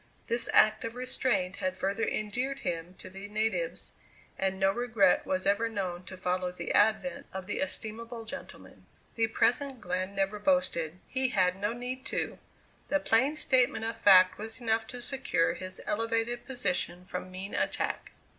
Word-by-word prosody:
This 235 0 0
act 215 0 +5
of 230 +1 -4
restraint 250 -7 0
had 185 0 -2
further 200 +4 -1
endeared 245 +6 -2
him 170 +1 -3
to - - -11
the 195 +2 -8
natives, 220 - -2 0.4
and 190 0 -1
no 195 0 +4
regret 220 -4 +2
was 185 0 0
ever 205 +3 +2
known 185 -4 -3
to 185 - -9
follow 180 0 -1
the 180 - -4
advent 265 +7 +2
of 190 -1 -5
the 205 - -3
estimable 230 -3 -4
gentleman. 220 - -9 0.3
The 225 -1 +2
present 260 +3 +1
Glenn 185 +1 -2
never 195 +2 0
boasted; 185 - +1
he 260 -1 0
had 185 -6 +2
no 205 +3 -1
need 250 +2 -4
to; - - -2 0.5
the 290 - +2
plain 270 +2 +3
statement 250 -6 +2
of 225 0 -2
fact 190 -5 +6
was 220 +2 -5
enough 225 -2 0
to 245 0 -6
secure 245 -12 +1
his 185 0 -7
elevated 230 +2 -1
position 180 -7 -1
from 185 0 -5
mean 185 +2 -7
attack. - - -2
215 Hz, 165 wpm, -30 LUFS, 185-240 Hz, 0.5 s, fact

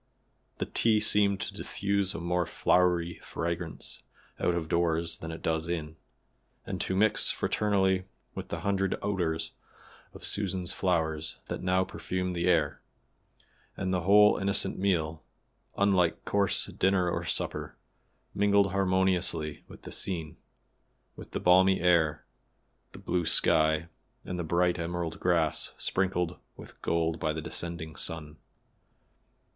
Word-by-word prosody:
The - - -2
tea 110 -2 +2
seemed 105 -2 +3
to - - -4
diffuse 100 -1 -1
a - - -4
more 85 0 -1
flowery 85 -1 +1
fragrance 85 -1 -5 0.4
out 90 - +1
of 80 -2 -2
doors 85 0 +1
than 80 - -7
it 80 - -8
does 80 +1 -1
in, 80 -2 -3 0.7
and - - -4
to 95 - -1
mix 110 +2 +3
fraternally 95 -3 +1 0.3
with - - -6
the - - -5
hundred 95 -1 0
odors 90 -6 -1 0.6
of - - -7
Susan's 95 -3 -1
flowers 80 -4 -1
that - - -4
now 90 0 +2
perfumed 90 -1 -4
the 85 +1 0
air, 80 -5 +2 1.0
and 95 -2 -2
the 90 - +1
whole 105 +4 +6
innocent 100 +1 +1
meal, 80 -5 0 0.6
unlike 95 -4 +2
coarse 100 -2 +2
dinner 95 -1 +1
or 85 - -1
supper, - - -2 0.6
mingled 100 -1 +3
harmoniously 95 -5 +1
with - - -14
the - - -9
scene, 80 -5 -2 0.8
with - - -11
the - - -4
balmy 95 +2 +5
air, 85 -3 +2 0.7
the - - -12
blue 90 -2 -1
sky 80 +1 +3 0.4
and 90 - -4
the - - -1
bright 85 +2 +1
emerald 85 -1 -3
grass 85 -3 +1
sprinkled 90 -3 -1 0.2
with - - -13
gold 80 -1 0
by 80 - 0
the 80 - -4
descending 85 -2 -5
sun. 75 -1 -1
90 Hz, 135 wpm, -29 LUFS, 80-95 Hz, 1.0 s, whole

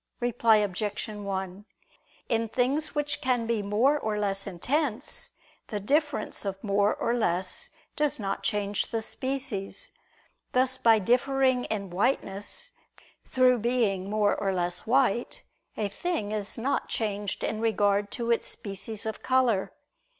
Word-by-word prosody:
Reply 235 -2 +4
Obj. 205 +1 -1
1: 195 -2 -4 0.6
In 230 -1 0
things 270 +7 +1
which 290 0 -1
can 250 -4 +1
be 230 -2 0
more 230 +9 +3
or 215 -4 -1
less 195 -1 0
intense, 255 - -1 0.3
the 210 - -3
difference 290 +3 0
of 195 -1 -4
more 200 0 +2
or 235 - 0
less 185 -6 -1 0.3
does 300 -4 +1
not 195 -2 -2
change 205 -2 0
the 225 -1 -2
species: 260 - -3 0.6
thus 255 0 +3
by 225 -1 +6
differing 255 +4 +2
in 200 -4 -3
whiteness 205 - -1 0.6
through 255 -1 +4
being 215 -5 +1
more 210 -1 +2
or 195 - 0
less 175 0 -1
white 245 -2 +2 0.3
a 210 - 0
thing 210 - -2
is 210 -2 -3
not 260 +5 -1
changed 205 -3 -2
in 220 - -1
regard 205 -2 +2
to 235 -1 -1
its 235 - +1
species 200 +2 -6
of 220 - -4
color. 255 -7 +2
220 Hz, 135 wpm, -28 LUFS, 200-255 Hz, 0.6 s, by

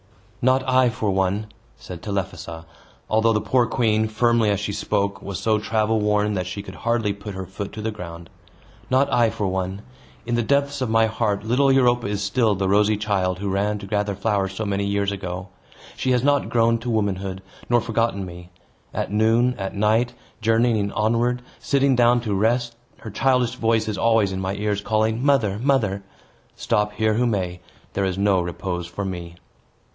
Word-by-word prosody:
"Not 130 +1 +2
I, 130 -1 +4
for 110 -4 -1
one," 95 +2 0 0.3
said 90 -2 -9
Telephassa; 95 -5 -4 0.4
although 110 +1 +3
the 105 - +2
poor 120 +3 +2
queen, 110 -2 +1
firmly 115 0 +2
as 100 -2 +1
she 100 0 -3
spoke, 100 -1 -1
was 100 -2 -5
so 110 -1 +1
travel 110 0 +1
worn 105 0 +1
that 90 -2 -2
she 100 +2 -5
could 95 - -9
hardly 115 -1 0
put 100 0 -8
her 95 0 -5
foot 95 +2 -6
to 110 - -6
the 110 - -1
ground. 85 -4 -8 0.6
"Not 135 +2 +2
I, 120 -2 +4
for 105 - -3
one! 95 +1 -2 0.4
In 120 - -2
the 120 - +2
depths 140 +3 0
of 130 - 0
my 115 0 +4
heart, 110 -2 -1
little 130 +5 +3
Europa 120 -3 +3
is 100 0 -2
still 110 +1 +2
the 95 0 -1
rosy 105 +2 +3
child 95 -4 0
who 100 0 -3
ran 105 +2 0
to 100 - -8
gather 105 0 -1
flowers 100 -1 0
so 110 - -3
many 100 0 -1
years 100 0 0
ago. 90 -1 -5 0.5
She 130 - -2
has 125 -1 +2
not 145 0 +2
grown 115 0 +3
to 120 +2 -5
womanhood, 95 -3 -1 0.3
nor 120 0 +4
forgotten 115 -3 -1
me. 90 0 -10 0.5
At - - -2
noon, 115 +4 +3
at 95 +1 -4
night, 110 +4 +2 0.3
journeying 115 -2 +2
onward, 120 +3 +1 0.2
sitting 140 -1 +2
down 120 0 +4
to 110 -3 -2
rest, 115 +4 +1 0.3
her 110 - -7
childish 125 +1 +2
voice 115 -3 +1
is 105 -3 -3
always 115 -4 +3
in 95 0 -3
my 95 +1 -2
ears, 105 0 -1
calling, 110 +3 0
'Mother! 115 -8 +2
mother!' 115 -7 +1 0.5
Stop 105 0 0
here 110 +1 +1
who 120 +3 +1
may, 90 -5 -2 0.3
there 100 - 0
is 95 -1 -2
no 100 -2 +3
repose 85 0 -4
for 100 +3 -5
me." 85 -2 -6
105 Hz, 190 wpm, -23 LUFS, 100-115 Hz, 0.6 s, I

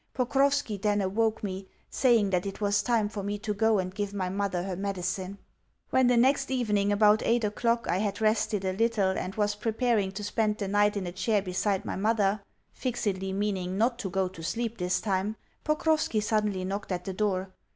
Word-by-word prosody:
Pokrovski 270 -2 +1
then 205 0 +2
awoke 215 +4 0
me, 190 -1 -4 0.2
saying 230 -6 +3
that 180 +1 0
it 195 - -6
was 205 -1 +2
time 230 -3 +1
for 205 -1 -5
me 205 +1 -3
to 210 +1 -3
go 220 +1 +3
and 185 -1 -2
give 205 0 -3
my 185 -2 -1
mother 190 -2 -1
her 190 -1 -3
medicine. 190 0 -3 0.5
When 260 -1 +4
the 245 -1 +4
next 270 +3 +3
evening, 210 -6 +1
about 210 +1 +5
eight 235 0 +2
o'clock, 230 +2 0
I 180 - +1
had 205 0 -2
rested 215 -2 +1
a 185 - 0
little 215 -2 +2
and 190 0 -4
was 210 -1 +1
preparing 220 -1 0
to 205 +2 -5
spend 210 0 0
the 200 - -3
night 205 +1 +2
in 195 - -3
a 175 - -4
chair 190 +3 0
beside 190 +1 -1
my - - -3
mother 205 -1 +1 0.3
(fixedly 205 -7 -2
meaning 190 -2 -2
not 235 +3 +1
to 195 - -3
go 190 0 0
to 180 -3 -10
sleep 230 +6 -3
this 180 0 0
time), 200 +1 -1 0.3
Pokrovski 305 -5 +1
suddenly 210 -3 0
knocked 200 +1 -4
at 180 -1 -3
the 190 - -3
door. 190 -2 -1
205 Hz, 200 wpm, -28 LUFS, 190-225 Hz, 0.5 s, about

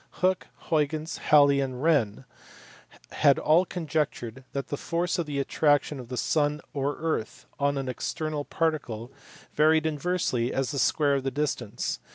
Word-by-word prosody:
Hooke, 185 0 +1 0.2
Huygens, 155 +1 0
Halley, 145 -2 +6
and 130 -1 -3
Wren 135 -8 +2 0.9
had 140 -2 +4
all 165 +4 +4
conjectured 150 -8 -3
that 140 -1 -4
the - - -1
force 175 +4 -1
of 165 - -1
the 145 -1 -3
attraction 145 0 +1
of 120 -2 -9
the 125 - -4
sun 150 +1 +1
or 140 0 -1
earth 160 -9 -3
on 140 0 +1
an 135 -1 -3
external 155 +3 -3
particle 145 -8 -2 0.4
varied 155 +1 +4
inversely 150 -6 0
as 135 0 -1
the 140 - -2
square 145 +2 +3
of 135 -1 0
the 135 - 0
distance. 135 -5 -2
145 Hz, 155 wpm, -27 LUFS, 135-155 Hz, 0.9 s, Halley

